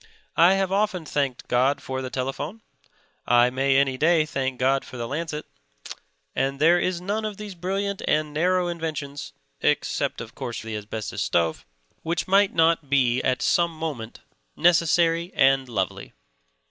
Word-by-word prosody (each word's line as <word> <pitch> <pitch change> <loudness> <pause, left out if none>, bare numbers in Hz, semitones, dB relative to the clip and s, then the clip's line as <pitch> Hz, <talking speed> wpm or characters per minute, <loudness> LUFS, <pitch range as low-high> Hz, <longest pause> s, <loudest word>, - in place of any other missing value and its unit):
I 175 +3 +7
have 195 -1 0
often 195 -4 0
thanked 140 -4 -2
God 130 +3 +2
for 130 0 -4
the 130 - -5
telephone; 135 - -4 0.6
I 120 +1 +5
may 135 +1 +2
any 135 -2 +1
day 160 -1 +4
thank 135 -3 -3
God 135 +1 +2
for 125 - -10
the 120 -1 -4
lancet; 150 +2 -4 0.9
and 135 0 -1
there 170 +4 +5
is 180 0 -1
none 205 +5 -2
of 210 -2 -4
these 210 -2 -7
brilliant 195 +3 -3
and 150 -1 +1
narrow 180 +3 +1
inventions 155 -4 -5 0.3
(except, - - 0
of - - -8
course, 120 - -5
the 110 -1 -5
asbestos 105 -2 -5
stove) 85 - 0 0.3
which 165 0 -2
might 195 +1 +4
not 165 -3 +2
be 130 -3 +2
at 130 0 0
some 175 -2 +3
moment 140 -8 -5 0.3
necessary 170 +1 +3
and 135 -1 +3
lovely. 95 -5 -3
150 Hz, 155 wpm, -24 LUFS, 130-175 Hz, 0.9 s, I